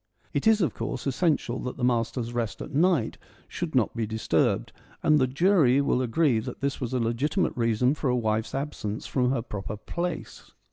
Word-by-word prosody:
(It - - 0
is, 220 -1 +5
of 170 - +1
course, - - -4
essential 135 -3 0
that 125 - -5
the 125 - -5
master's 120 0 0
rest 115 -5 -2
at - - -7
might 160 -5 +2 0.3
should 170 -5 -4
not 120 -3 +2
be 115 -2 -1
disturbed, 110 0 0 0.3
and 150 -1 +5
the 130 - +3
jury 140 -2 +4
will 140 -2 +2
agree 130 0 +2
that 110 - -6
this 140 0 -2
was 125 - -2
a 130 - +1
legitimate 120 - 0
reason 120 +2 +2
for 150 -3 -2
a 125 - +2
wife's 110 -1 -1
absence 125 -7 -4
from 125 -2 +1
her 130 -3 0
proper 105 -2 -5
place.) 170 +10 -5
125 Hz, 190 wpm, -27 LUFS, 115-150 Hz, 0.3 s, is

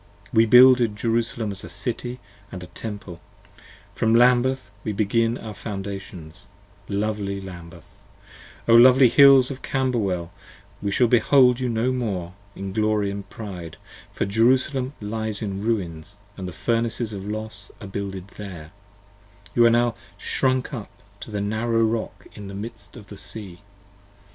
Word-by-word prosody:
We 115 +1 +5
builded 125 -2 +7
Jerusalem 115 0 -1
as 100 0 -6
a 90 - -8
City 120 +6 -4 0.2
& 100 0 -27
a - - -6
Temple; 90 -1 -8 0.7
from 110 0 +2
Lambeth 125 -1 +3
We 105 - -2
began 115 +3 +1
our 110 -1 -8
Foundations; 95 -3 -7 0.4
lovely 100 -1 -2
Lambeth, 90 -3 -10 0.8
O 115 - +5
lovely 125 +2 +8
Hills 135 0 +7
5 135 - -5
Of - - -23
Camberwell, 105 -10 -1 0.5
we 100 - -1
shall 120 +5 +3
behold 125 +1 +4
you 125 -1 -1
no 115 +2 0
more 100 -9 -3 0.2
in 95 -1 -6
glory 105 -2 +1
& - - -29
pride, 90 -8 -8 0.3
For - - -2
Jerusalem 130 +5 +2
lies 110 0 -3
in 100 -2 -4
ruins 100 -5 -3
& 100 - -31
the 95 -2 -6
Furnaces 115 +3 -1
of 100 0 -6
Los 110 -1 -5
are 105 - -9
builded 95 -1 -6
there: 90 -7 -8 0.8
You 120 - +5
are - - +5
now 120 0 +2 0.2
shrunk 130 +5 0
up 115 -5 -6 0.3
to 105 -2 -6
a - - -1
narrow 115 +2 0
Rock 110 0 -2
in 105 -2 -9
the 100 - -8
midst 110 +1 -8
of 105 - -11
the 100 -1 -11
Sea. 95 -1 -7
110 Hz, 150 wpm, -23 LUFS, 100-120 Hz, 0.8 s, lovely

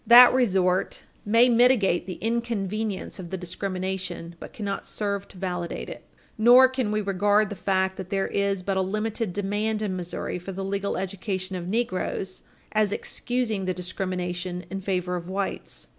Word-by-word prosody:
That 245 +2 +10
resort 190 -6 +2 0.2
may 230 +4 +5
mitigate 235 -7 +4
the 185 - -4
inconvenience 220 -4 -2
of 175 -2 -7
the 190 - -3
discrimination, 185 -1 -4
but - - -9
cannot 200 -3 -4
serve 200 -1 -2
to 195 - -15
validate 180 -2 -3
it. - - -9 0.4
Nor 245 +3 +8
can 255 -5 -1
we 215 0 +1
regard 205 +1 +2
the - - -3
fact 190 0 0
that 190 -1 -6
there 195 -1 0
is 200 -2 0
but 195 0 0
a - - +3
limited 215 +2 -1
demand 205 +3 -1
in 195 -3 -1
Missouri 180 0 -4
for 190 +2 -7
the 195 +1 -4
legal 200 +1 -1
education 190 0 -3
of 175 -1 -4
negroes 190 -3 -2 0.3
as 215 -2 +2
excusing 230 -4 -2
the 185 -1 -1
discrimination 180 0 -3
in 195 0 -3
favor 180 -2 -1
of 175 0 -5
whites. 195 +1 -4
195 Hz, 165 wpm, -26 LUFS, 185-215 Hz, 0.4 s, That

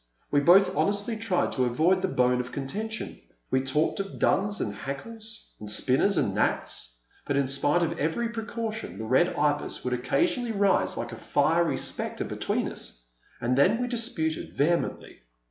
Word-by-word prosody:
We 145 - +4
both 185 +5 +5
honestly 205 +3 0
tried 220 -5 0
to 130 - +1
avoid 165 +10 +2
this 190 - 0
bone 125 0 +2
of 125 0 -9
contention. 215 +11 -5 0.3
We 130 - +3
talked 140 +7 0
of 195 0 -5
Duns 205 +1 +1
and 100 - -2
Hackles, 220 - -8
and 105 - -8
Spinners 135 - +3
and - - +1
Gnats, - - -1 0.3
but 145 - 0
in 140 - +2
spite 145 +5 +2
of 165 0 -2
every 165 +11 0
precaution 225 -1 -5
the - - -5
Red 130 +10 +2
Ibis 145 0 0
would 125 - -1
occasionally 240 - 0
rise 200 -2 +2
like 120 0 -4
a - - -6
fiery 165 +7 +1
spectre - - -2
between - - -1
us, - - -6 0.4
and 120 +1 0
then 185 - +4
we 245 - -1
disputed 225 -10 -2
vehemently. 170 +4 -1
165 Hz, 165 wpm, -27 LUFS, 130-210 Hz, 0.4 s, both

